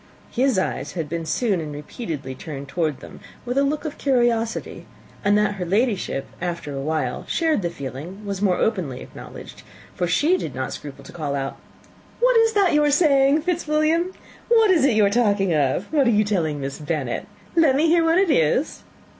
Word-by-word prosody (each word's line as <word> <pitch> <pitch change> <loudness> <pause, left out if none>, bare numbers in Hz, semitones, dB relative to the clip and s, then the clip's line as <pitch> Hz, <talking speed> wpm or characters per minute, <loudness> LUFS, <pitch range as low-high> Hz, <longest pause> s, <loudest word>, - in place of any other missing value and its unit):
His 255 -2 +1
eyes 190 - -2
had 165 -4 -3
been 165 +1 -4
soon 195 +2 0
and 155 -1 -6
repeatedly 145 - -6
turned 140 0 -8
towards 155 -2 -2
them - - -11 0.3
with 245 +1 -2
a 275 - +3
look 295 +3 -1
of 300 - -5
curiosity; 240 -4 0 0.4
and 205 +1 +4
that 210 -1 +2
her 185 - -3
Ladyship, 195 - 0 0.2
after 170 -4 -4
a 135 - -4
while, 150 -4 -2
shared 320 -8 +1
the 170 - -1
feeling, 155 +8 -8
was 200 -1 -4
more 185 -3 +2
openly 170 - -1
acknowledged, - - -11 0.3
for 180 - -1
she 300 - +3
did 140 - -5
not 130 0 -3
scruple 145 -2 -9
to - - -12
call 150 -4 -3
out, 135 -1 -3 0.6
"What - - +4
is 455 0 +4
that 400 -4 +3
you 300 0 +4
are 295 - +3
saying, 285 -1 +4
Fitzwilliam? 330 0 +1 0.4
What 450 -3 +5
is 330 -7 +4
it 260 -6 +3
you 215 -1 +5
are 200 - +2
talking 200 -5 +2
of? 150 +5 +1
What 285 -4 +3
are - - +5
you 215 -2 +4
telling 165 -8 -1
Miss 135 +1 -5
Bennet? 145 -5 -3 0.3
Let 320 -6 +4
me 300 +4 +3
hear 330 +1 +4
what 330 +1 +3
it 380 -3 +3
is." 255 - +1
205 Hz, 195 wpm, -22 LUFS, -, 0.6 s, What